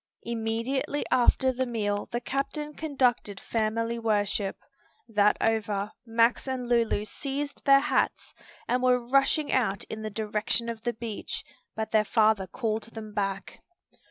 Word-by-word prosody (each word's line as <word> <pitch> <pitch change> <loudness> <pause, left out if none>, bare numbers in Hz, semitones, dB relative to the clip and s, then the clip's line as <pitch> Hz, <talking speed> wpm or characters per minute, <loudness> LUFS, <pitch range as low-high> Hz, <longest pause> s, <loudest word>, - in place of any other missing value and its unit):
Immediately 235 +5 -1
after 255 +1 +4
the 260 0 -1
meal 205 -3 -1
the 240 - -1
captain 285 +4 -3
conducted 255 -10 0
family 230 +1 -1
worship. 205 -3 0 0.5
That 210 -2 +3
over, 210 -2 0 0.2
Max 230 +3 +2
and 255 -2 -3
Lulu 230 -3 +2
seized 280 +5 -4
their 275 -1 +7
hats, - - 0 0.3
and 250 +1 +1
were 250 0 +4
rushing 275 +3 +3
out 210 -7 +1
in 220 - -5
the 215 - -3
direction 215 +2 -1
of 230 -1 -5
the 240 +1 -1
beach, 225 -2 -5 0.3
but 220 0 -3
their 215 -1 +4
father 215 -3 +3
called 220 +2 -2
them 215 -1 -7
back. 195 -2 -3
230 Hz, 140 wpm, -28 LUFS, 215-255 Hz, 0.5 s, their